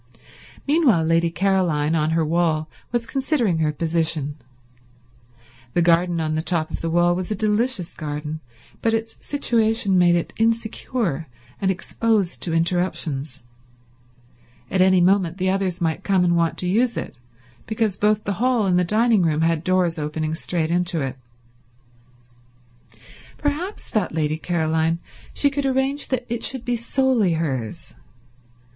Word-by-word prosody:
Meanwhile 280 Hz, -, +4 dB
Lady 165 Hz, +1 st, +2 dB
Caroline, 170 Hz, -4 st, +1 dB
on 155 Hz, -1 st, +1 dB
her 160 Hz, 0 st, +1 dB
wall, 160 Hz, -1 st, +1 dB, 0.2 s
was 240 Hz, -1 st, -1 dB
considering 245 Hz, -, 0 dB
her 155 Hz, -1 st, +1 dB
position. 160 Hz, -2 st, -1 dB, 1.4 s
The 175 Hz, -, +3 dB
garden 170 Hz, 0 st, +3 dB
on 155 Hz, -1 st, -1 dB
the 155 Hz, -, 0 dB
top 165 Hz, -2 st, -1 dB
of -, -, -5 dB
the 165 Hz, -, -2 dB
wall 175 Hz, +1 st, +3 dB
was 185 Hz, 0 st, -4 dB
a 215 Hz, -, -1 dB
delicious 215 Hz, -2 st, 0 dB
garden, 150 Hz, 0 st, -5 dB, 0.4 s
but 225 Hz, 0 st, +2 dB
its 225 Hz, 0 st, -4 dB
situation 225 Hz, -8 st, +1 dB
made 175 Hz, -1 st, +5 dB
it 170 Hz, -, -2 dB
insecure 225 Hz, -, -1 dB, 0.3 s
and 195 Hz, -, +1 dB
exposed 200 Hz, +1 st, 0 dB
to 170 Hz, -, 0 dB
interruptions. 165 Hz, -5 st, -1 dB, 1.3 s
At 190 Hz, -, +2 dB
any 185 Hz, -1 st, +5 dB
moment 185 Hz, -1 st, +2 dB
the 185 Hz, 0 st, +1 dB
others 190 Hz, -3 st, -1 dB
might 160 Hz, -2 st, -1 dB
come 190 Hz, -3 st, +2 dB
and 175 Hz, -1 st, +2 dB
want 165 Hz, -1 st, +1 dB
to 180 Hz, -, -2 dB
use 235 Hz, +6 st, +1 dB
it, -, -, -5 dB, 0.5 s
because 220 Hz, -3 st, 0 dB
both 210 Hz, +1 st, +1 dB
the 200 Hz, -, -1 dB
hall 250 Hz, -4 st, +2 dB
and 180 Hz, -2 st, +3 dB
the -, -, +3 dB
dining 215 Hz, +3 st, +3 dB
room 160 Hz, -2 st, +1 dB
had 165 Hz, -1 st, +1 dB
doors 180 Hz, -2 st, +1 dB
opening 155 Hz, +1 st, -2 dB
straight 165 Hz, 0 st, -2 dB
into 175 Hz, -1 st, 0 dB
it. 130 Hz, -1 st, -3 dB, 2.2 s
Perhaps, 310 Hz, +8 st, -3 dB
thought 205 Hz, -7 st, -1 dB
Lady 155 Hz, 0 st, 0 dB
Caroline, 160 Hz, -1 st, 0 dB, 0.3 s
she 285 Hz, -, +2 dB
could 280 Hz, 0 st, -1 dB
arrange 265 Hz, +2 st, 0 dB
that 250 Hz, -2 st, -2 dB
it 235 Hz, 0 st, -3 dB
should 260 Hz, -3 st, +1 dB
be 245 Hz, -, 0 dB
solely 235 Hz, -4 st, +1 dB
hers. 135 Hz, -9 st, -3 dB
180 Hz, 150 wpm, -22 LUFS, 160-225 Hz, 2.2 s, made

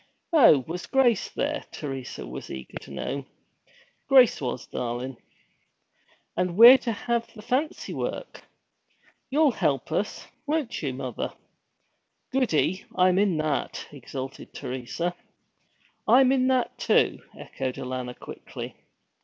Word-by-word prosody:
'Oh, 195 Hz, -, +7 dB
was 175 Hz, +2 st, -5 dB
Grace 245 Hz, -6 st, +3 dB
there?' 295 Hz, +1 st, -2 dB
Teresa 135 Hz, -4 st, -6 dB
was -, -, -8 dB
eager 65 Hz, -1 st, -7 dB
to -, -, -13 dB
know. 140 Hz, 0 st, -4 dB, 0.8 s
'Grace 260 Hz, -, +6 dB
was, 125 Hz, -1 st, -3 dB
darlin'.' 125 Hz, +2 st, -4 dB, 1.2 s
'And 180 Hz, 0 st, -1 dB
we're 245 Hz, +4 st, +11 dB
to 235 Hz, -, -2 dB
have 235 Hz, +2 st, -2 dB
the 210 Hz, -, -11 dB
fancy 280 Hz, +8 st, -1 dB
work! -, -, -5 dB, 0.9 s
You'll 295 Hz, +1 st, +4 dB
help 150 Hz, -, -1 dB
us, 195 Hz, +6 st, -2 dB, 0.2 s
won't 295 Hz, -5 st, -1 dB
you, 140 Hz, -4 st, -1 dB
mother? 130 Hz, -2 st, -4 dB, 1.0 s
Goody 190 Hz, -, +1 dB
I'm 185 Hz, 0 st, +4 dB
in 200 Hz, -5 st, +2 dB
that!' 155 Hz, -2 st, -2 dB
exulted 135 Hz, -1 st, -8 dB
Teresa. 130 Hz, +7 st, -3 dB, 0.9 s
'I'm 260 Hz, +1 st, +6 dB
in 260 Hz, -1 st, +3 dB
that, 255 Hz, -2 st, +1 dB
too!' -, -, +3 dB, 0.2 s
echoed 130 Hz, -1 st, -4 dB
Alanna 125 Hz, -1 st, -5 dB
quickly. -, -, -8 dB
180 Hz, 120 wpm, -26 LUFS, -, 1.2 s, we're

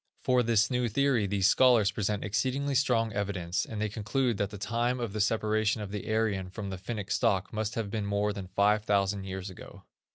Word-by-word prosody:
For 125 Hz, -1 st, +3 dB
this 110 Hz, -2 st, +2 dB
new 125 Hz, -1 st, +1 dB
theory 125 Hz, -3 st, +2 dB
these 100 Hz, -1 st, 0 dB
scholars 115 Hz, -3 st, +5 dB
present 105 Hz, 0 st, -2 dB
exceedingly 135 Hz, +7 st, -1 dB
strong 120 Hz, -5 st, +2 dB
evidence, 95 Hz, -4 st, -2 dB
and 110 Hz, -, -6 dB
they 110 Hz, -, 0 dB
conclude 110 Hz, +3 st, -1 dB
that 100 Hz, 0 st, -1 dB
the 105 Hz, -, -8 dB
time 120 Hz, +4 st, -1 dB
of 115 Hz, -4 st, -3 dB
the 110 Hz, -, -1 dB
separation 110 Hz, 0 st, +1 dB
of 105 Hz, -2 st, -6 dB
the 105 Hz, +1 st, -4 dB
Aryan 105 Hz, -4 st, 0 dB
from 100 Hz, 0 st, -6 dB
the 95 Hz, -, -6 dB
Finnic 105 Hz, 0 st, -5 dB
stock 100 Hz, -1 st, +1 dB
must 110 Hz, 0 st, -2 dB
have 110 Hz, -3 st, -3 dB
been 105 Hz, -2 st, -2 dB
more 100 Hz, +1 st, 0 dB
than 100 Hz, -2 st, -7 dB
five 105 Hz, +3 st, +2 dB
thousand 100 Hz, -1 st, 0 dB
years 95 Hz, 0 st, -5 dB
ago. 90 Hz, -, -12 dB
105 Hz, 205 wpm, -29 LUFS, 100-115 Hz, -, scholars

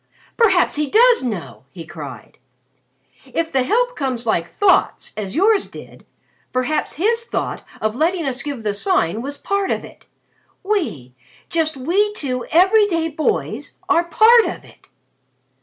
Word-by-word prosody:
"Perhaps 390 Hz, -10 st, +3 dB
he 300 Hz, -1 st, -1 dB
does 480 Hz, -, +5 dB
know!" 210 Hz, -, -5 dB
he 165 Hz, +2 st, -10 dB
cried. 140 Hz, -9 st, -10 dB, 0.8 s
"If 325 Hz, +5 st, -3 dB
the 265 Hz, -, +2 dB
help -, -, +1 dB
comes 255 Hz, -4 st, -3 dB
like 170 Hz, -7 st, 0 dB
thoughts 400 Hz, -, +1 dB
as 205 Hz, -2 st, -5 dB
yours 405 Hz, +4 st, +3 dB
did -, -, -13 dB, 0.4 s
perhaps 270 Hz, +5 st, -1 dB
his 460 Hz, +7 st, +1 dB
thought -, -, -4 dB, 0.2 s
of 215 Hz, 0 st, -1 dB
letting 330 Hz, +4 st, 0 dB
us 265 Hz, -1 st, -2 dB
give 280 Hz, -6 st, -5 dB
the 210 Hz, -1 st, -1 dB
Sign 215 Hz, -, 0 dB
was 280 Hz, +3 st, -5 dB
part 400 Hz, -1 st, -1 dB
of -, -, -1 dB
it. -, -, -17 dB, 0.6 s
We 315 Hz, -, -2 dB, 0.4 s
just 315 Hz, -3 st, 0 dB
we 390 Hz, +10 st, +1 dB
two 255 Hz, -, -4 dB
every 390 Hz, +6 st, +5 dB
day 330 Hz, -4 st, -1 dB
boys 310 Hz, 0 st, -2 dB
are 345 Hz, -2 st, +3 dB
part 450 Hz, +6 st, +6 dB
of -, -, -5 dB
it!" -, -, -20 dB
315 Hz, 150 wpm, -20 LUFS, 245-400 Hz, 0.8 s, part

